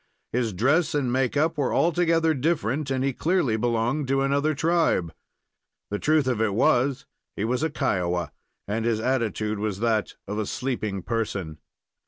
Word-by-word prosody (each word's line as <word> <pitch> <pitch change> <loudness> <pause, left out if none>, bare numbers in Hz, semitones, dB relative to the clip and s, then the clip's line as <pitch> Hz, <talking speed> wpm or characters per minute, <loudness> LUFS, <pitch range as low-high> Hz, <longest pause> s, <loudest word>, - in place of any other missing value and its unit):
His 120 -2 0
dress 140 - +2
and 130 -4 0
make 130 +1 +1
up 155 +1 +1
were 135 - +1
altogether 165 -1 +3
different, 145 -1 -1
and 130 -1 0
he 135 0 0
clearly 160 -7 +1
belonged 120 +5 0
to 135 +1 +1
another 140 +2 +1
tribe. 155 - +1 0.8
The 105 - -1
truth 155 -2 +2
of 125 -4 0
it 105 -3 +1
was, 125 +3 +2 0.3
he 105 - -2
was 125 +3 0
a 160 - +1
Kiowa, 90 - -1 0.4
and 110 +3 -1
his 115 -1 +1
attitude 110 -4 -1
was 105 -2 -2
that 110 -2 0
of 105 +2 -3
a 105 - -2
sleeping 110 -7 -3
person. 100 -9 -3
125 Hz, 165 wpm, -25 LUFS, 110-145 Hz, 0.8 s, altogether